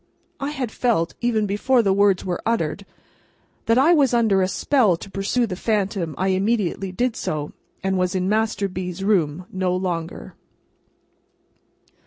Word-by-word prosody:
I 275 Hz, 0 st, -2 dB
had 265 Hz, -6 st, -4 dB
felt, 220 Hz, -11 st, 0 dB
even 230 Hz, -3 st, +1 dB
before 230 Hz, +5 st, +2 dB
the 195 Hz, -2 st, +3 dB
words 200 Hz, -1 st, +3 dB
were 180 Hz, -2 st, -2 dB
uttered, 200 Hz, -4 st, -1 dB, 0.8 s
that 230 Hz, +1 st, +4 dB
I 295 Hz, +7 st, +5 dB
was 275 Hz, -6 st, +3 dB
under 220 Hz, -5 st, +3 dB
a 185 Hz, -, +2 dB
spell 210 Hz, -, +2 dB
to 195 Hz, -, -11 dB
pursue 200 Hz, +5 st, 0 dB
the 195 Hz, -5 st, -4 dB
phantom. 195 Hz, -5 st, -1 dB
I 190 Hz, +1 st, 0 dB
immediately 195 Hz, -1 st, 0 dB
did 240 Hz, +4 st, -1 dB
so, 150 Hz, -1 st, -4 dB, 0.3 s
and 190 Hz, -1 st, 0 dB
was 180 Hz, 0 st, 0 dB
in 185 Hz, 0 st, 0 dB
Master 215 Hz, -1 st, 0 dB
B.'s 185 Hz, 0 st, -5 dB
room 180 Hz, -5 st, +1 dB
no 185 Hz, -1 st, 0 dB
longer. 170 Hz, -, -4 dB
195 Hz, 155 wpm, -22 LUFS, 185-230 Hz, 0.8 s, I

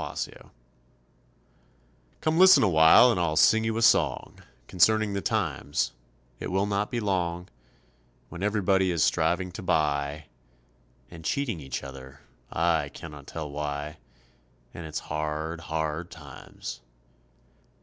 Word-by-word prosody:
HARD -, -, -7 dB
TIMES -, -, -4 dB, 1.8 s
Come 160 Hz, +1 st, +1 dB
listen 190 Hz, -4 st, +8 dB
a -, -, +4 dB
while 80 Hz, +9 st, +7 dB
and 100 Hz, -, -1 dB
I'll 80 Hz, -3 st, 0 dB
sing 110 Hz, +7 st, +5 dB
you 110 Hz, 0 st, -1 dB
a 115 Hz, -, 0 dB
song -, -, +2 dB, 0.3 s
Concerning 110 Hz, +3 st, +3 dB
the 100 Hz, -, -2 dB
times 95 Hz, -10 st, -1 dB, 0.5 s
it -, -, -5 dB
will 95 Hz, +2 st, +1 dB
not 105 Hz, 0 st, -1 dB
be 120 Hz, -, -2 dB
long 90 Hz, -4 st, -2 dB, 0.8 s
When 85 Hz, -, -9 dB
everybody 100 Hz, -2 st, +1 dB
is 85 Hz, -3 st, +1 dB
striving 90 Hz, +3 st, +1 dB
to 85 Hz, -, -8 dB
buy, 75 Hz, -4 st, -1 dB, 0.9 s
And 85 Hz, -2 st, -11 dB
cheating 120 Hz, -, -2 dB
each 65 Hz, -3 st, -5 dB
other, 70 Hz, +1 st, -11 dB, 0.3 s
I 80 Hz, -3 st, +1 dB
cannot 75 Hz, -2 st, -11 dB
tell 75 Hz, -3 st, -6 dB
why, 75 Hz, +1 st, -4 dB, 0.8 s
And 85 Hz, -2 st, -8 dB
it's 75 Hz, -, -5 dB
hard, 75 Hz, +2 st, -4 dB
hard 80 Hz, +1 st, -3 dB
times. 70 Hz, -4 st, -10 dB
85 Hz, 130 wpm, -27 LUFS, 75-100 Hz, 1.8 s, listen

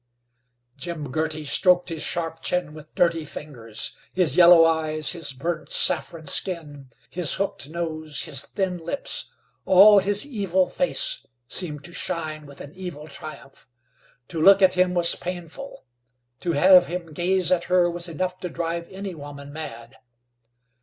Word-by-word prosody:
Jim 155 Hz, -6 st, -6 dB
Girty 155 Hz, +1 st, -2 dB
stroked 180 Hz, +5 st, +3 dB
his 165 Hz, -2 st, -5 dB
sharp 165 Hz, -1 st, -3 dB
chin 180 Hz, -4 st, -1 dB
with 155 Hz, 0 st, -14 dB
dirty 170 Hz, -2 st, +2 dB
fingers. 125 Hz, -7 st, -7 dB, 0.2 s
His 175 Hz, -7 st, +2 dB
yellow 170 Hz, -2 st, +8 dB
eyes, 155 Hz, -2 st, 0 dB
his 170 Hz, -5 st, -4 dB
burnt 155 Hz, +4 st, -4 dB
saffron 165 Hz, -2 st, +2 dB
skin, 145 Hz, -4 st, -3 dB, 0.2 s
his 175 Hz, -4 st, 0 dB
hooked 195 Hz, -7 st, -3 dB
nose, 155 Hz, -3 st, -3 dB
his 140 Hz, -3 st, -1 dB
thin 185 Hz, -3 st, -3 dB
lips 170 Hz, +12 st, -4 dB, 0.3 s
all 200 Hz, +2 st, +7 dB
his 205 Hz, +4 st, +5 dB
evil 195 Hz, -8 st, 0 dB
face 270 Hz, -, -1 dB, 0.2 s
seemed 150 Hz, -4 st, -1 dB
to 175 Hz, -, -8 dB
shine 155 Hz, -5 st, -4 dB
with 140 Hz, -, -13 dB
an 145 Hz, -, -11 dB
evil 175 Hz, -5 st, -8 dB
triumph. 140 Hz, -2 st, -10 dB, 0.6 s
To 165 Hz, -3 st, -4 dB
look 195 Hz, +3 st, +6 dB
at 185 Hz, -, +5 dB
him 180 Hz, 0 st, +1 dB
was 170 Hz, -1 st, +5 dB
painful. 180 Hz, -, -8 dB, 0.5 s
To 170 Hz, -, -2 dB
have 180 Hz, +3 st, +6 dB
him 170 Hz, -2 st, -6 dB
gaze 180 Hz, +2 st, 0 dB
at 175 Hz, -2 st, +2 dB
her 180 Hz, -1 st, +3 dB
was 175 Hz, 0 st, +1 dB
enough 185 Hz, +3 st, -3 dB
to 180 Hz, -, -5 dB
drive 170 Hz, 0 st, -4 dB
any 195 Hz, 0 st, -7 dB
woman 145 Hz, -2 st, -10 dB
mad. 120 Hz, -7 st, -9 dB
170 Hz, 150 wpm, -24 LUFS, 155-180 Hz, 0.6 s, yellow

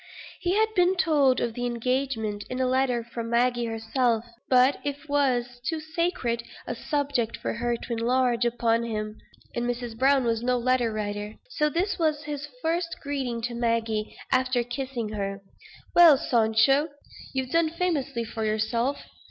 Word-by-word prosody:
He 360 Hz, +1 st, 0 dB
had 440 Hz, +1 st, +2 dB
been 365 Hz, -1 st, +3 dB
told 290 Hz, -7 st, +3 dB
of 235 Hz, -, -1 dB
the 245 Hz, +1 st, -2 dB
engagement, 240 Hz, -3 st, -1 dB
in 255 Hz, -, -3 dB
a 260 Hz, -, +2 dB
letter 255 Hz, -2 st, +1 dB
from 230 Hz, 0 st, -6 dB
Maggie 240 Hz, 0 st, +2 dB
herself; 225 Hz, +1 st, 0 dB, 0.2 s
but 255 Hz, +2 st, +5 dB
it 285 Hz, +1 st, -4 dB
was 245 Hz, -4 st, 0 dB
too 320 Hz, +3 st, -1 dB
sacred 315 Hz, -7 st, -1 dB, 0.2 s
a -, -, -3 dB
subject 280 Hz, -6 st, -1 dB
for -, -, -3 dB
her 240 Hz, 0 st, -1 dB
to 235 Hz, -, -5 dB
enlarge 240 Hz, +1 st, +2 dB
upon 235 Hz, -1 st, +2 dB
to 235 Hz, -, -3 dB
him; 215 Hz, -1 st, -4 dB, 0.3 s
and 240 Hz, -, -2 dB
Mrs. 240 Hz, -1 st, -3 dB
Browne 270 Hz, +2 st, +4 dB
was 230 Hz, -1 st, 0 dB
no 250 Hz, +1 st, +1 dB
letter 245 Hz, -1 st, +2 dB
writer. 210 Hz, 0 st, -4 dB, 0.2 s
So 300 Hz, -7 st, +1 dB
this 350 Hz, +6 st, -1 dB
was 310 Hz, -2 st, +1 dB
his 295 Hz, -1 st, -5 dB, 0.2 s
first 335 Hz, +1 st, 0 dB
greeting 260 Hz, -5 st, -3 dB
to 240 Hz, +1 st, -2 dB
Maggie; 230 Hz, -2 st, -1 dB
after 255 Hz, -1 st, +2 dB
kissing 245 Hz, -2 st, -4 dB
her: 195 Hz, -1 st, -4 dB, 0.5 s
"Well, 335 Hz, -5 st, +8 dB
Sancho, 235 Hz, +6 st, +3 dB, 0.4 s
you've 260 Hz, -1 st, -3 dB
done 330 Hz, -1 st, +3 dB
famously 300 Hz, -8 st, -1 dB
for 225 Hz, 0 st, -5 dB
yourself. 230 Hz, +5 st, 0 dB
245 Hz, 160 wpm, -26 LUFS, 230-285 Hz, 0.5 s, Well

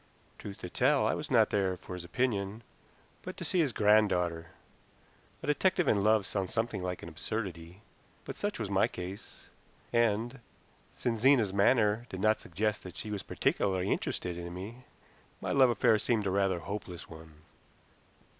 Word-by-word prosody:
Truth 100 Hz, -1 st, -8 dB
to 90 Hz, -, -5 dB
tell, -, -, +3 dB
I -, -, +2 dB
was -, -, -4 dB
not -, -, +4 dB
there 95 Hz, -2 st, +1 dB
for 90 Hz, -, -9 dB
his 90 Hz, -1 st, -6 dB
opinion, 105 Hz, +2 st, -1 dB, 0.6 s
but -, -, -8 dB
to -, -, -5 dB
see 185 Hz, -, +1 dB
his 150 Hz, -6 st, +3 dB
granddaughter. 95 Hz, -7 st, +3 dB, 1.0 s
A -, -, -3 dB
detective 170 Hz, +5 st, +2 dB
in 100 Hz, -2 st, +3 dB
love 110 Hz, -1 st, +4 dB
sounds 95 Hz, -2 st, -3 dB
something 115 Hz, -3 st, -1 dB
like 90 Hz, 0 st, -4 dB
an 85 Hz, -, -7 dB
absurdity, 90 Hz, 0 st, -5 dB, 0.4 s
but -, -, -6 dB
such 205 Hz, 0 st, -2 dB
was 110 Hz, -, -3 dB
my 95 Hz, -, +3 dB
case, 90 Hz, +2 st, -9 dB, 0.4 s
and, 115 Hz, +2 st, +1 dB, 0.6 s
since 115 Hz, -2 st, -1 dB
Zena's 120 Hz, -5 st, +4 dB
manner 105 Hz, +2 st, +3 dB
did 95 Hz, -, -6 dB
not 110 Hz, +2 st, +2 dB
suggest 105 Hz, +4 st, -1 dB
that 90 Hz, -1 st, -10 dB
she 105 Hz, -, -5 dB
was 100 Hz, -2 st, -3 dB
particularly 95 Hz, 0 st, 0 dB
interested 90 Hz, -1 st, -2 dB
in 85 Hz, 0 st, -6 dB
me, 115 Hz, +7 st, -8 dB, 0.5 s
my -, -, -3 dB
love 135 Hz, -2 st, +5 dB
affair 110 Hz, -1 st, +3 dB
seemed 110 Hz, -1 st, 0 dB
rather 95 Hz, -1 st, +1 dB
a -, -, -7 dB
hopeless 100 Hz, -1 st, -6 dB
one. 80 Hz, -1 st, -13 dB
100 Hz, 165 wpm, -31 LUFS, 90-115 Hz, 1.0 s, love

